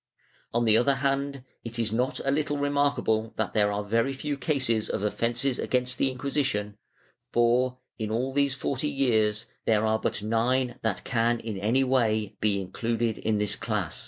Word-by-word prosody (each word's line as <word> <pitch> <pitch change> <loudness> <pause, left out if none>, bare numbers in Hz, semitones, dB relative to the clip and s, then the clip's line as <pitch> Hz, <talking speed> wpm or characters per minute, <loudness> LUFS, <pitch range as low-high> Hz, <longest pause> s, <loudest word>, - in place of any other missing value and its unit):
On 120 0 +1
the 110 -1 +5
other 135 +4 +3
hand 140 0 -1 0.2
it 115 0 -5
is 115 -2 -1
not 125 +3 0
a 135 - +2
little 145 0 0
remarkable 140 -6 +1
that 110 -5 -2
there 105 -1 +3
are 105 0 -2
very 115 +6 +1
few 145 +2 -3
cases 130 -7 0
of - - -2
offences 120 +5 0
against 125 -1 0
the 135 - +3
Inquisition, 130 -6 -1 0.6
for, 125 +2 +2 0.2
in 110 -1 -2
all 125 +4 -1
these 140 -1 +2
forty 135 +2 -2
years, 110 -6 +1 0.2
there 110 -1 +3
are 110 0 +2
but 105 - -2
nine 120 +3 +1
that 110 -4 -1
can 120 -1 +1
in 110 -4 -5
any 115 +7 +2
way 110 -5 +1
be 105 -2 +2
included 115 +4 -2
in 110 -1 0
this 105 0 +2
class. 105 -7 -2
120 Hz, 175 wpm, -27 LUFS, 110-135 Hz, 0.6 s, the